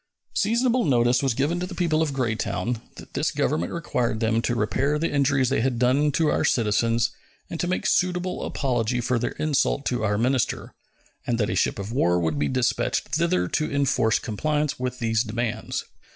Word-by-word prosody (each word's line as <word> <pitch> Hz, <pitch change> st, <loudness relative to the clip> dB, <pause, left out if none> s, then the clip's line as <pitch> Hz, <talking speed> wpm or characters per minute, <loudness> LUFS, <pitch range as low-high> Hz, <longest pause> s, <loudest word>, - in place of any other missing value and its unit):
Seasonable 240 Hz, +3 st, +2 dB
notice 120 Hz, -3 st, +3 dB
was 135 Hz, -4 st, 0 dB
given 150 Hz, +7 st, 0 dB
to 180 Hz, -, -3 dB
the 180 Hz, -, -8 dB
people 165 Hz, -3 st, +1 dB
of 160 Hz, -3 st, 0 dB
Greytown 110 Hz, -3 st, -2 dB
that -, -, -13 dB
this -, -, 0 dB
Government 85 Hz, +2 st, -1 dB
required 125 Hz, -9 st, -1 dB
them 115 Hz, 0 st, +1 dB
to 120 Hz, -, -1 dB
repair 130 Hz, +8 st, 0 dB
the 165 Hz, +2 st, -1 dB
injuries 140 Hz, -2 st, +2 dB
they -, -, +1 dB
had 125 Hz, -1 st, 0 dB
done 130 Hz, +5 st, +3 dB
to 155 Hz, +1 st, +2 dB
our -, -, +1 dB
citizens 115 Hz, +1 st, +2 dB, 0.4 s
and 165 Hz, -, -4 dB
to 175 Hz, -, 0 dB
make 185 Hz, -, -1 dB
suitable 180 Hz, 0 st, 0 dB
apology 125 Hz, -3 st, -1 dB
for 120 Hz, 0 st, 0 dB
their 120 Hz, -, -2 dB
insult 145 Hz, -2 st, 0 dB
of 125 Hz, -, -1 dB
our 105 Hz, -1 st, +1 dB
minister, 125 Hz, +2 st, 0 dB, 0.5 s
and 120 Hz, -, +1 dB
that 105 Hz, -3 st, 0 dB
a -, -, -1 dB
ship -, -, +1 dB
of 100 Hz, +2 st, -5 dB
war 90 Hz, -8 st, +2 dB
would 80 Hz, -4 st, -1 dB
be 75 Hz, -, +1 dB
dispatched 70 Hz, -, 0 dB
thither 155 Hz, -, +1 dB
to 155 Hz, -, -1 dB
enforce 135 Hz, -5 st, +2 dB
compliance 150 Hz, +6 st, -1 dB
with 125 Hz, 0 st, -3 dB
these 115 Hz, -2 st, +1 dB
demands. 115 Hz, 0 st, -3 dB
125 Hz, 190 wpm, -24 LUFS, 115-150 Hz, 0.5 s, notice